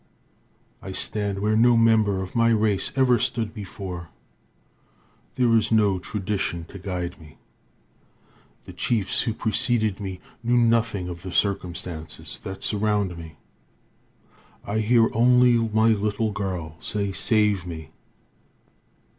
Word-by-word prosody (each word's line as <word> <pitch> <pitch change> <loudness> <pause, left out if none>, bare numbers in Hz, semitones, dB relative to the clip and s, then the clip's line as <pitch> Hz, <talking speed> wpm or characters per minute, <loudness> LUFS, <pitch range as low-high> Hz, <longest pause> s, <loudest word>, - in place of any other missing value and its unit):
I - - -7
stand 100 -2 -2
where 105 +1 +2
no 120 +1 +5
member 110 -4 +3
of 95 - -10
my 115 0 +4
race 110 -3 +2
ever 125 -3 +4
stood 110 0 -2
before. 95 -5 -7 1.3
There 120 -3 +3
is 110 0 +2
no 105 -4 +3
tradition 95 -4 -3
to 100 - -10
guide 90 -2 -5
me. 75 -4 -15 1.3
The - - -10
chiefs 110 -5 0
who 115 - -2
preceded 110 -2 +1
me 95 -3 -5 0.2
knew 120 +1 +2
nothing 115 -5 +2
of 85 -1 -7
the 95 0 -7
circumstances 85 -5 -3
that 95 0 -7
surround 105 -3 0
me. 80 -2 -10 1.3
I 105 +2 -1
hear 115 +1 +4
only 125 +2 +5 0.2
my 110 +1 +3
little 105 0 0
girl 90 -6 -4
say, 100 -2 -2
"Save 100 +1 +1
me." 80 -3 -8
105 Hz, 125 wpm, -24 LUFS, 95-115 Hz, 1.3 s, no